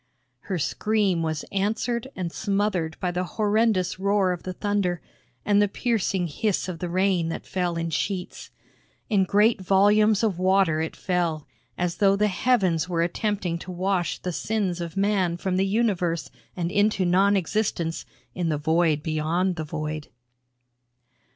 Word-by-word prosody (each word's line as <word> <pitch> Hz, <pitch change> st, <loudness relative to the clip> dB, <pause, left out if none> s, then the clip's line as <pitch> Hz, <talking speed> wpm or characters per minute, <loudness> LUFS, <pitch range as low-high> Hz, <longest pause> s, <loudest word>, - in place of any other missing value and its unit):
Her 190 Hz, -, -4 dB
scream 200 Hz, +1 st, 0 dB
was 160 Hz, -2 st, -2 dB
answered 220 Hz, +5 st, -1 dB
and 175 Hz, -3 st, -3 dB
smothered 195 Hz, -6 st, -1 dB
by 180 Hz, -, -1 dB
the 180 Hz, +1 st, -1 dB
horrendous 210 Hz, -4 st, +1 dB
roar 200 Hz, -1 st, +2 dB
of 180 Hz, -, -4 dB
the 185 Hz, -, -5 dB
thunder, 200 Hz, -3 st, -1 dB, 0.5 s
and 205 Hz, 0 st, +4 dB
the 205 Hz, -, +4 dB
piercing 200 Hz, -4 st, 0 dB
hiss 190 Hz, +5 st, -1 dB
of 175 Hz, -3 st, -5 dB
the 175 Hz, -, -3 dB
rain 185 Hz, -2 st, +1 dB
that -, -, -5 dB
fell 180 Hz, -2 st, -2 dB
in 165 Hz, 0 st, -2 dB
sheets. 185 Hz, +2 st, -3 dB, 0.6 s
In 195 Hz, -3 st, +4 dB
great 210 Hz, +2 st, +3 dB
volumes 205 Hz, +3 st, +4 dB
of 200 Hz, -6 st, 0 dB
water, 185 Hz, -4 st, +3 dB
it 160 Hz, -, -4 dB
fell, 170 Hz, -5 st, -1 dB, 0.3 s
as 175 Hz, -1 st, -1 dB
though 195 Hz, -1 st, +4 dB
the 210 Hz, +1 st, +2 dB
heavens 185 Hz, -6 st, +1 dB
were 170 Hz, -2 st, +1 dB
attempting 180 Hz, -1 st, -1 dB
to 185 Hz, -, -8 dB
wash 180 Hz, 0 st, -1 dB
the 180 Hz, -, -4 dB
sins 190 Hz, -3 st, -1 dB
of 170 Hz, +2 st, -6 dB
man 195 Hz, -4 st, +1 dB
from 185 Hz, 0 st, -1 dB
the 195 Hz, +1 st, +2 dB
universe 190 Hz, -6 st, 0 dB, 0.3 s
and 170 Hz, -1 st, -2 dB
into 205 Hz, -1 st, +2 dB
non 195 Hz, +3 st, +4 dB
existence 175 Hz, -3 st, -1 dB, 0.3 s
in 175 Hz, -2 st, -1 dB
the 155 Hz, -, 0 dB
void 160 Hz, 0 st, +1 dB
beyond 165 Hz, +4 st, 0 dB
the 160 Hz, -, -4 dB
void. 155 Hz, 0 st, -4 dB
185 Hz, 155 wpm, -25 LUFS, 170-205 Hz, 0.6 s, and